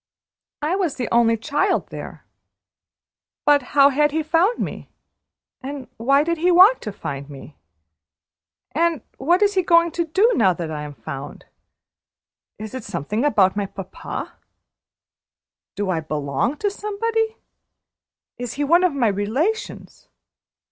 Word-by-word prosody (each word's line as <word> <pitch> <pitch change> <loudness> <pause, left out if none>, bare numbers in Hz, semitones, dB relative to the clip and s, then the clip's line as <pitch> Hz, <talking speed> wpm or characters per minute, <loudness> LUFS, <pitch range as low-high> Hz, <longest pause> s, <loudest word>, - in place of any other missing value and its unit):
"I 320 +5 +1
was 365 -7 -1
the 245 -3 -3
only 230 -1 +4
child 295 - 0
there; - - -9 1.2
but 290 -1 +5 0.2
how 280 0 +7
had 295 +2 +3
he 315 +2 -1
found 345 +9 +2
me, - - -5 0.7
and 270 -1 -7
why 275 +5 +3
did 335 0 -1
he 350 +3 +2
want 375 +8 +6
to 210 - -5
find 140 -7 -6
me? 140 +1 -11 1.2
And 330 -3 0 0.2
what 345 +9 +3
is 405 0 +3
he 380 - +2
going 335 -1 +4
to 340 +1 -1
do, 385 +9 +3
now 185 - +3
I 155 -3 -4
am 150 -1 -8
found? 135 +3 -8 1.1
Is 215 0 -8
it 260 - -6
something 205 - -3
about 200 -10 +3
my 205 -1 -1
papa? 190 -1 -7 1.4
Do 200 -2 -1
I 165 - 0
belong 155 - -2
to 410 +3 -1
somebody? 445 +2 -2 1.0
Is 245 -2 -4
he 290 - -2
one 340 +5 +4
of 355 -6 +2
my 250 -4 +2
relations? 230 - -2
280 Hz, 140 wpm, -22 LUFS, -, 1.4 s, how